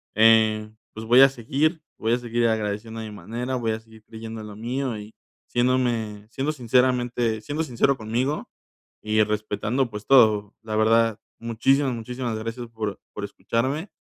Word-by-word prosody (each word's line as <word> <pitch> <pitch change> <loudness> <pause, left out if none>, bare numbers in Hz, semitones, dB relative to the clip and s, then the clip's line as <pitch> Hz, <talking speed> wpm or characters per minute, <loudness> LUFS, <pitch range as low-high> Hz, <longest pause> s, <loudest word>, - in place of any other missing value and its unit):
eh, 110 -1 +5 0.2
pues 110 +1 -7
voy 120 +4 +7
a 135 - +9
seguir 140 +6 -1 0.2
voy 115 +1 +1
a - - +3
seguir 120 -1 0
agradeciendo 110 +1 -2
a - - -5
mi 110 - -7
manera, 120 +5 -4
voy 115 -2 -1
a 110 - -4
seguir 110 -1 -18
creyendo 110 0 -8
lo 105 -1 -9
mío 120 +2 -3
y 105 +1 -10 0.3
siéndome 120 -4 0
siendo 135 +5 -1
sinceramente 125 -3 +1
siendo 150 +6 -2
sincero 135 -1 +2
conmigo 120 +5 -2 0.5
y 110 0 +2
respetando, 110 +4 -1
pues, 105 0 -7
todo. 110 -6 +5
La 110 -1 -4
verdad, 115 0 +3 0.2
muchísimas, 130 +4 +1
muchísimas 120 0 -4
gracias 115 +2 -5
por 110 -3 -4
por 105 - -6
escucharme, 130 - -2
115 Hz, 160 wpm, -24 LUFS, 110-125 Hz, 0.5 s, a